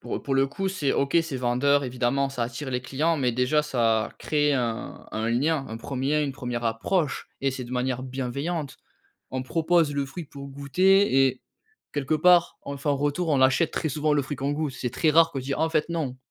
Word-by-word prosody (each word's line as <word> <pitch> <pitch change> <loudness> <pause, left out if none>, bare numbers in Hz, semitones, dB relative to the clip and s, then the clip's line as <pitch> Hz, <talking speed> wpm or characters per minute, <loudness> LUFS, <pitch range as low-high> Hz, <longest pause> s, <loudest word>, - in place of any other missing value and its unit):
pour, - - -4
heu, - - -7
pour 135 - -1
le 135 0 +3
coup 190 +8 -3
c'est 155 -8 -1
OK, 140 +4 +1
c'est 160 -5 -5
vendeur 130 +3 +2
évidemment, 125 +2 0
ça 130 -3 -3
attire 130 +4 -4
les 125 0 -1
clients 155 +6 0
mais 125 -4 +1
déjà, 125 +5 +2
ça 115 -6 +1
crée 150 -1 +1
un 120 -4 -3
un 110 +1 -1
lien, 140 +3 +1
un 110 - -5
1er 140 +5 -1
une 140 -2 -2
1re 125 -2 -4
approche 135 +8 -1
et 135 - +1
c'est 130 -1 -5
de 120 - -9
manière 130 0 -1
bienveillante. 135 +4 -4 0.6
On 130 0 -2
propose 165 0 +2
le 140 -1 -1
fruit 150 +6 -7
pour 140 -1 -10
goûter 140 +2 +3
et 130 0 -4 0.5
quelque 145 +1 -1
part, 175 +2 +4
on 140 0 -5
fait 140 - -2
un 145 - +4
retour, 145 +4 -1
on 140 -3 +2
achète 130 +5 +3
très 160 - -2
souvent 150 +1 +1
le 145 - +2
fruit 140 +2 -5
qu'on 140 +1 -1
goûte. 150 -3 -2
C'est 125 - -3
très 160 - +2
rare 165 +1 +5
qu'on 135 - -3
dit: 135 +2 -3
«Ah, - - -4
en 160 - +2
fait, 155 0 0
non». 155 -7 -2
140 Hz, 225 wpm, -26 LUFS, 130-155 Hz, 0.6 s, rare